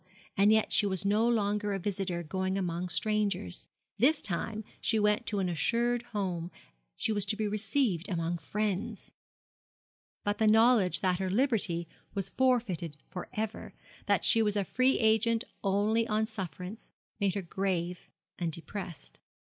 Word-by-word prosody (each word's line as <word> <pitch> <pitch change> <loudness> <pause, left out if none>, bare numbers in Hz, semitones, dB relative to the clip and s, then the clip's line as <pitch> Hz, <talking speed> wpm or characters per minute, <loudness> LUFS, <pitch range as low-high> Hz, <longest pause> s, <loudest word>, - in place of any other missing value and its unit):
And 200 +2 +5
yet 220 0 +3
she 205 - +4
was 190 -1 -2
no 210 +3 +3
longer 205 -2 +1
a - - 0
visitor 185 -2 -2
going 190 +3 -2
among 180 -1 -2
strangers 205 - -1 0.3
this 290 +7 +4
time 215 +4 -3 0.2
she 225 - +2
went 210 0 +2
to 210 - -1
an 190 -2 +1
assured 235 +8 +1
home, 185 -7 -3 0.5
she - - -1
was 205 -2 +1
to 210 - +2
be 215 0 -1
received 205 - 0
among 170 -1 -1
friends. 200 +4 -3 1.1
But 205 +2 -1
the 220 - +4
knowledge 220 -6 +5
that 185 -1 +1
her 190 -1 -1
liberty 195 -7 +1 0.3
was 195 -2 +1
forfeited 220 - 0
for 180 - -6
ever, 220 -1 -4 0.3
that - - +2
she 225 - +5
was 210 -2 +1
a 205 - +2
free 255 +5 +2
agent 225 +1 +3 0.2
only 210 +3 +2
on 215 0 +1
sufferance, 195 -1 -6 0.3
made 200 -2 +1
her 200 - -2
grave 180 -1 -2 0.3
and 170 -2 -1
depressed. 170 -1 -7
205 Hz, 155 wpm, -30 LUFS, 180-220 Hz, 1.1 s, And